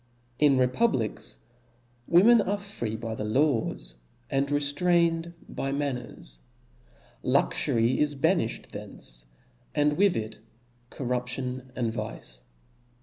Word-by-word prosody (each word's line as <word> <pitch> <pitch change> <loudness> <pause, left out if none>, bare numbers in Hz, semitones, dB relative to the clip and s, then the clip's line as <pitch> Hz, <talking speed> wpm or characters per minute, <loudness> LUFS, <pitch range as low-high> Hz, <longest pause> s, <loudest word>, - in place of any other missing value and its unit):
In 145 -3 +5
republics 125 - +1 0.7
women 215 +7 +7
are 205 +1 0
free 200 - -4
by 115 0 -4
the 110 - -4
laws, 110 - 0 0.3
and 135 +1 +2
reftraiped 165 +3 +2 0.2
by 135 - -3
manners; 130 - -4 0.8
luxury 115 +2 +2
is 150 -1 +1
banifhed 160 -4 +1
from - - -17
thence, - - -7 0.5
and 150 0 +2
with 200 -1 +4
it 110 -1 -5 0.5
corruption 125 0 -3
and 115 -3 -1
vice. 105 - -6
135 Hz, 105 wpm, -28 LUFS, 115-165 Hz, 0.8 s, women